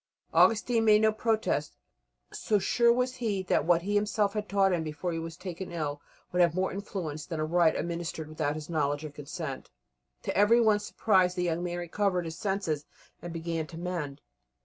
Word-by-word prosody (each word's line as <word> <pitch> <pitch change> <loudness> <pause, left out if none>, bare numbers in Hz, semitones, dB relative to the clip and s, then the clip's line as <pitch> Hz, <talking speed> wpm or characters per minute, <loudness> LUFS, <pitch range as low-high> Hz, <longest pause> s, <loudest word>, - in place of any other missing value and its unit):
Augustine 225 +1 +4
made 215 -1 +5
no 220 - +5
protest, 215 -9 0 0.6
so 210 - +1
sure 235 +4 +3
was 250 +2 0
he 210 -6 -1
that 175 - +1
what 170 0 +3
he 205 +2 -2
himself 205 0 +1
had 210 -1 -3
taught 195 -1 +3
him 170 - +1
before 155 +3 -3
he 165 - -2
was 165 0 -6
taken 185 0 -6
ill 150 -4 -3 0.3
would 180 - +2
have 170 -2 +4
more 185 +1 0
influence 180 -7 -5
than 165 -3 -4
a 155 - 0
rite 170 0 +3
administered 170 -2 -3
without 155 -1 -2
his 155 0 -6
knowledge 145 -2 -1
or 150 - -6
consent. 145 0 -6 0.5
To - - -3
everybody's 210 0 +4
surprise 185 -5 +2
the 180 - -1
young 170 -1 0
man 175 0 -3
recovered 180 +1 0
his 160 0 -5
senses 190 -8 -2 0.4
and 175 - -6
began 165 -1 -3
to 165 - -10
mend. 170 -5 -4
175 Hz, 190 wpm, -29 LUFS, 160-205 Hz, 0.6 s, made